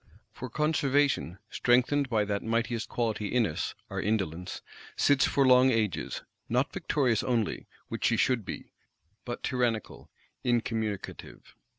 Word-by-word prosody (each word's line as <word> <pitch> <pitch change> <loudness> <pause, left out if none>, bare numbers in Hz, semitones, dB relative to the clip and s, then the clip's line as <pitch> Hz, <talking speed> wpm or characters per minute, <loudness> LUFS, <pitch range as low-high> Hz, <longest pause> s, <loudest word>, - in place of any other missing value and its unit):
For 125 - -7
Conservation, 145 - +1
strengthened 130 +3 +2
by 110 -3 +2
that 100 -1 -1
mightiest 115 0 -1
quality 110 -3 -1
in 120 +1 +2
us, 80 -6 -3
our - - -3
indolence, 90 -4 -2 0.3
sits 140 -2 +4
for 140 - +2
long 130 0 +6
ages, 110 -9 -1 0.3
not 125 +4 +1
victorious 125 -7 +1
only, 115 -4 -1 0.2
which - - -3
she - - +3
should 125 -4 +2
be; - - -7 0.5
but 120 0 -5
tyrannical, 120 -4 -1 0.3
incommunicative. 115 -4 -2
120 Hz, 125 wpm, -29 LUFS, 110-130 Hz, 0.5 s, long